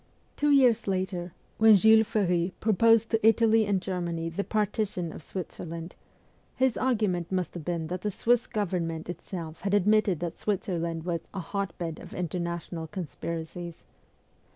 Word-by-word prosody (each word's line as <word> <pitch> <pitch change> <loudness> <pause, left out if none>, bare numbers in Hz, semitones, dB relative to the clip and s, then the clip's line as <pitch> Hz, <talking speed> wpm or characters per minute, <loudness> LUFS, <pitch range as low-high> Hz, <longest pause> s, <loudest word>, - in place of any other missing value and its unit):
Two 295 - +1
years 255 -7 +4
later, 185 -2 -2 0.3
when 220 -1 +8
Jules 220 +2 +6
Ferry 180 -3 0
proposed 225 +1 +4
to 225 -2 +1
Italy 225 -1 +4
and 200 -2 +2
Germany 170 -3 -3
the 170 +5 -3
partition 205 -5 -1
of - - -9
Switzerland, 170 -1 -6 0.6
his 260 -2 +2
argument 210 -9 0
must 185 -3 -1
have 170 - -7
been 170 0 -2
that 180 +3 -4
the 210 - -1
Swiss 240 +4 +1
Govern 185 -6 -1
ment 165 +1 -4
itself 170 -3 -7
had 200 +2 +1
admitted 205 -3 +3
that 175 -2 -4
Switzerland 170 -5 -2
was 170 -1 -1
' - - -37
a - - -2
hotbed 175 -3 -4
of - - -10
international 170 -1 -3
conspiracies.' 170 0 -6
185 Hz, 150 wpm, -28 LUFS, 170-215 Hz, 0.6 s, when